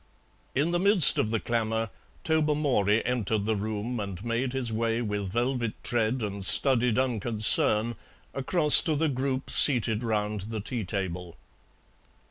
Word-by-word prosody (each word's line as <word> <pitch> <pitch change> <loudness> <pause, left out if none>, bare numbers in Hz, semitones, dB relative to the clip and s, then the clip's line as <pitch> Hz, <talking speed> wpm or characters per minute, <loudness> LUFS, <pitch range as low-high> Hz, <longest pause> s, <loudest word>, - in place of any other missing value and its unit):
In 150 +6 0
the 175 - 0
midst 195 -6 +5
of 105 - 0
the 115 0 -1
clamour 115 -2 -2 0.3
Tobermory 145 -9 0
entered 110 -4 -2
the 110 0 -1
room 110 +3 -4
and 100 0 -7
made 120 +2 -2
his 125 -3 -4
way 115 +1 -1
with 105 -4 -4
velvet 120 0 -2
tread 120 +1 -1
and 100 -1 -5
studied 125 +2 +2
unconcern 115 -2 +1 0.4
across 150 +3 +4
to 160 -4 -1
the 155 +2 0
group 130 0 -3
seated 120 -5 +5
round 105 -3 -2
the 110 -1 -5
tea 115 +2 -4
table. 90 -3 -5
115 Hz, 140 wpm, -26 LUFS, 105-130 Hz, 0.4 s, midst